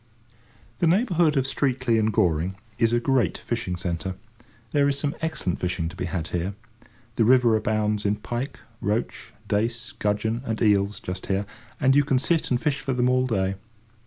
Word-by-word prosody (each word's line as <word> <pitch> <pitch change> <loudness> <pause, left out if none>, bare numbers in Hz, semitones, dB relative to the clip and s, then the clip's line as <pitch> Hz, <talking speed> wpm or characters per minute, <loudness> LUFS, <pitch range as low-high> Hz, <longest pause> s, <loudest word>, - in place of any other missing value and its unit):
The 170 - +3
neighbourhood 175 - +3
of 130 - +2
Streatley 130 -4 +1
and 110 0 +2
Goring 90 -1 +1 0.2
is 115 -1 +3
a 120 - +3
great 120 - +1
fishing 115 -6 -3
centre. 90 0 -3 0.6
There 145 -1 +3
is 140 - 0
some 145 0 -1
excellent 160 - -2
fishing 90 -2 -1
to 90 - -11
be 90 - -3
had 80 -2 -3
here. 90 +3 -2 0.6
The 115 - +4
river 120 -1 +5
abounds 105 -1 0
in 105 0 +2
pike, 120 +5 -5 0.2
roach, 105 +4 -2 0.2
dace, 115 +4 -1
gudgeon, 110 -1 -1
and 110 -4 -3
eels, 100 -1 +2
just 90 +1 -6
here; 100 +1 0 0.3
and 135 -1 +4
you 145 - +6
can 135 -2 +2
sit 160 +5 +1
and 125 - +2
fish 150 0 0
for 135 - -2
them 125 0 +2
all 130 0 +2
day. 95 -5 0
115 Hz, 180 wpm, -25 LUFS, 95-130 Hz, 0.6 s, you